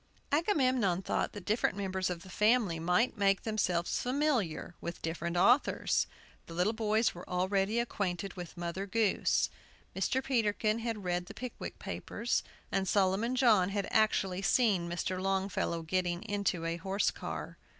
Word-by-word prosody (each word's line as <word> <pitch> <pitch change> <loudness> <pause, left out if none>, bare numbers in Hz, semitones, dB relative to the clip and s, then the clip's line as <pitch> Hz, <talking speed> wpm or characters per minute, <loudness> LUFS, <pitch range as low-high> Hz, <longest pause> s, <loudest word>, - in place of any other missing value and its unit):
Agamemnon 255 - +2
thought - - -1
that 205 -3 -8
different 215 -2 +1
members 190 -1 -1
of 170 -2 -4
the 190 - -12
family 210 -5 +3
might 180 +8 +1
make 195 -1 +3
themselves 185 -6 0
familiar 250 - 0
with 170 - -5
different 170 +1 -2
authors; 245 +10 +3 0.4
the 165 - -8
little 180 +6 +2
boys 220 0 +1
were 175 - -10
already 195 +4 +1
acquainted 195 -5 -2
with 175 -3 -8
"Mother 175 +3 -3
Goose." 215 0 +2 0.4
Mr. 260 0 0
Peterkin 220 -3 +1
had 225 -3 -3
read 175 0 -1
the - - -10
"Pickwick 250 -1 -6
Papers," 240 - -2 0.3
and 190 0 0
Solomon 200 +6 +2
John 220 -8 +4
had 200 0 -2
actually 195 -4 +2
seen 195 -6 +2
Mr. 185 +2 -2
Longfellow 190 -3 -1
getting 175 +2 -1
into 200 -5 -1
a 165 0 -1
horse 195 +3 0
car. - - -6
195 Hz, 150 wpm, -32 LUFS, 180-225 Hz, 0.4 s, John